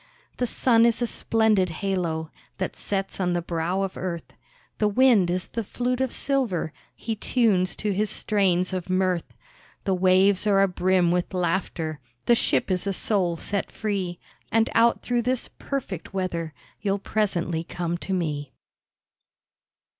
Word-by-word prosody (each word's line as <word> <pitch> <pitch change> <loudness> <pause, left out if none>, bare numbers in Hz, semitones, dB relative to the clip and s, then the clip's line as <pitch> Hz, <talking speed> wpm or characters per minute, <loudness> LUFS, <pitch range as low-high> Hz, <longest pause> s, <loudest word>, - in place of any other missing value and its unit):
The 250 - 0
sun 230 0 +3
is 235 - +1
a - - +3
splendid 220 -5 +2
halo, 165 -2 -2 0.3
That 185 - -3
sets 195 -1 -3
on 180 -2 +1
the 175 - 0
brow 170 +3 -1
of 195 - -3
earth, 175 -2 -5 0.5
The 210 - +3
wind 215 -4 +4
is 180 +1 -1
the 230 - -4
flute 245 +4 -2
of 260 -2 0
silver 240 - 0 0.2
He 225 - -3
tunes 205 -5 +2
to 210 - -1
his 210 +2 0
strains 190 -4 +1
of 185 -1 -3
mirth. 185 -2 0 0.5
The 195 - +1
waves 185 +2 +4
are 195 -1 +5
abrim 180 -1 +2
with 180 +2 -1
laughter, 165 -3 -1 0.3
The 240 - +5
ship 230 - +2
is 185 +1 0
a 195 - +1
soul 185 -4 +1
set 200 +4 -2
free; 195 -5 -2 0.3
And 225 0 +3
out 230 +1 +4
through 245 -1 +1
this 250 +1 -1
perfect 200 - -4
weather 170 -5 -2 0.3
You'll 200 -1 +1
presently 180 -6 -1
come 175 0 -3
to 195 - -6
me. 150 -7 -2
190 Hz, 155 wpm, -25 LUFS, 175-215 Hz, 0.5 s, are